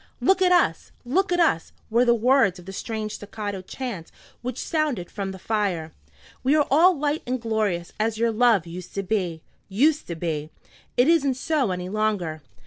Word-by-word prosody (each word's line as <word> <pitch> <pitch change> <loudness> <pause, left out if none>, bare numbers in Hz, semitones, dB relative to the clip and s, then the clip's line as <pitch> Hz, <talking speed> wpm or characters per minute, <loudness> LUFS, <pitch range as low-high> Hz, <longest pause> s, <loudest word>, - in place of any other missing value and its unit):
"Look 380 0 +3
at 365 -1 +4
us! 355 - +2
look 360 +10 +1
at 355 - +2
us!" 315 - +2 0.2
were 235 +2 +4
the 235 -1 +5
words 235 -5 +3
of 180 - -13
the 195 - -8
strange 215 +1 -4
staccato 205 -2 -5
chant 195 -4 -6 0.3
which 250 +1 -4
sounded 295 - -1
from 195 -2 -4
the 190 - -8
fire. 190 -6 -1 0.5
"We 270 +4 +3
are 300 -2 +4
all 340 +4 +6
light 295 +2 0
and 255 +1 -1
glorious 215 -7 -1
as 220 0 0
your 230 +1 +2
love 225 -5 +3
used 175 +1 -9
to 195 - -1
be, 180 -5 -2 0.3
used 290 +10 +2
to 170 - -4
be. 155 -2 -3 0.5
It 245 +2 +5
isn't 285 -6 +3
so 275 -2 0
any 180 -1 -3
longer." 195 -6 -1
220 Hz, 185 wpm, -24 LUFS, 185-270 Hz, 0.5 s, all